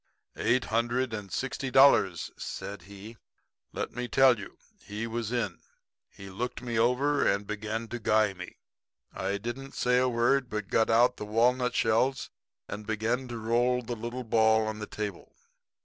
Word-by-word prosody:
"'Eight 125 +2 +1
hundred 120 +2 0
and 105 -3 -6
sixty 135 0 -3
dollars,' 125 -10 +4
said 100 0 -6
he. 100 +3 -11 0.5
'Let - - -4
me 125 0 -3
tell 130 -2 +5
you. 100 - -10 0.3
He 105 +2 -5
was 115 -1 -3
in. 115 -8 -2 0.5
He 100 - -12
looked 120 +6 -4
me 120 -2 -1
over 135 +5 +2
and 100 +1 +1
began 105 +2 -4
to 120 +2 -5
guy 110 -2 +2
me. 90 -1 -10 0.6
I 95 +1 -2
didn't 125 +6 -6
say 125 0 +2
a 130 0 +2
word, 120 +2 +2
but 105 -3 -4
got 110 - +2
out 120 +2 +4
the 105 - -5
walnut 125 +4 +2
shells 125 +5 +1 0.4
and 105 0 -7
began 115 +4 -1
to 120 -1 -6
roll 120 +3 +1
the 120 +1 -4
little 120 +3 -5
ball 110 -1 +3
on 110 0 -4
the 105 - -5
table. 105 -4 -6
115 Hz, 165 wpm, -29 LUFS, 105-125 Hz, 0.6 s, tell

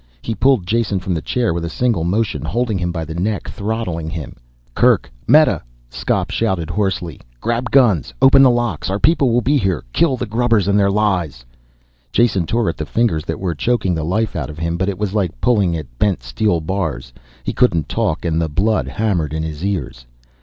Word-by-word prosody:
He 115 - -2
pulled 125 -4 +2
Jason 105 -1 0
from 95 0 -3
the 80 - -2
chair 120 -2 0
with 85 0 -3
a 85 - -3
single 115 -1 0
motion, 100 +6 0
holding 115 -3 -1
him 90 -1 -1
by 80 -2 -4
the 80 - -6
neck, 100 +5 -2
throttling 100 -7 -3
him. 80 -3 -6 0.4
"Kerk! - - +3 0.2
Meta!" - - +5 0.3
Skop - - -1
shouted 85 -4 -1
hoarsely. 95 -7 -2 0.2
"Grab 120 - -1
guns! 110 - +3
Open 135 +1 +7
the 135 - +7
locks 120 -10 -1
our 95 - 0
people'll 130 -3 +3
be 145 +5 +2
here, 95 - 0
kill 140 -6 +2
the 125 - -3
grubbers 115 -3 +1
and 100 +1 +3
their 100 -1 +3
lies!" 90 - 0 0.7
Jason 100 -8 +2
tore 115 +1 0
at 85 - -2
the 75 - -3
fingers 95 -10 0
that 80 - -4
were 90 -3 -2
choking 95 +2 0
the 80 -2 -2
life 105 +6 -1
out 75 -7 -3
of 75 - -9
him, 85 +1 -2
but 95 +3 -1
it 95 - -3
was 100 -1 -2
like 95 - -1
pulling 100 - +2
at - - -10
bent 95 -12 +1
steel 90 - 0
bars. 80 -4 -3 0.3
He - - -3
couldn't 85 - +2
talk - - -1
and 80 -1 +1
the 80 - -1
blood 100 +9 +1
hammered 85 -9 -1
in 80 - -2
his 80 +1 -5
ears. 95 -11 -3
95 Hz, 205 wpm, -18 LUFS, 80-115 Hz, 0.7 s, Open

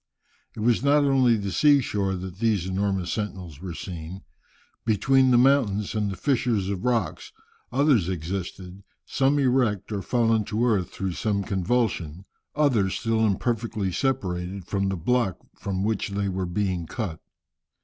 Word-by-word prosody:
It 110 - -6
was 115 +1 +2
not 145 +2 +4
only 130 -4 +4
on 105 - -3
the 100 - -2
sea 145 +4 +5
shore 100 -6 -1
that 95 0 -7
these 105 -6 +1
enormous 95 -1 -1
sentinels 95 -8 -5
were 90 -3 -6
seen. 90 +1 -7 0.6
Between 130 +4 +3
the 125 - +5
mountains, 120 -6 +3
in 105 -2 0
the 95 - -4
fissures 115 -6 0
of 100 0 -3
rocks, 120 -3 -1 0.4
others 130 - +3
existed, 90 +2 -5 0.2
some 135 +2 +1
erect 125 -7 +1
or 100 -2 -2
fallen 115 +1 +2
to 110 +4 0
earth 100 -7 +1
through 95 -1 -3
some 100 +1 -1
convulsion, 95 -4 -1 0.3
others 120 -11 +2
still 115 -1 0
imperfectly 110 -1 0
separated 95 -6 -2
from 100 0 -1
the 95 - -2
block 110 0 +1 0.2
from 95 -1 -3
which 105 -1 -1
they 100 0 -1
were 95 -1 -2
being 90 -2 -2
cut. 90 -8 -4
100 Hz, 155 wpm, -25 LUFS, 95-120 Hz, 0.6 s, sea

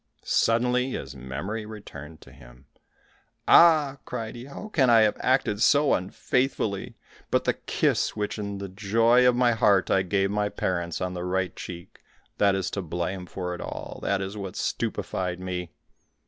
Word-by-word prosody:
Suddenly, 125 +3 +2
his - - -6
memory 75 - -5
returned 80 -8 -10
to - - -15
him. - - -17 0.8
"Ah," 150 -5 +6
cried 115 -3 -5
he, 120 +1 -8
"how 140 +10 -9
can 135 -11 +3
I 115 -1 +7
have 105 -1 +3
acted 125 -5 +1
so 145 +3 +4
unfaithfully; 110 +3 -1 0.3
but - - +2
the - - +1
kiss - - 0
which 105 0 -3
in 100 -1 -4
the 100 0 -5
joy 115 +6 +3
of 125 - +4
my 125 -1 +3
heart 100 -4 +3
I 95 - +4
gave 95 +1 0
my 105 0 0
parents, 85 -3 -2
on 90 0 -2
the 90 -1 -5
right 90 0 -1
cheek, 85 -1 -9 0.4
that 100 -1 +4
is 95 -2 -2
to 100 - -3
blame 90 +2 -4
for 90 -1 -4
it 90 - -7
all, - - -7
that 100 -1 0
is 95 +2 -6
what 100 -3 -6
stupefied 90 -1 -2
me!" 90 -2 -4
100 Hz, 170 wpm, -26 LUFS, 90-115 Hz, 0.8 s, I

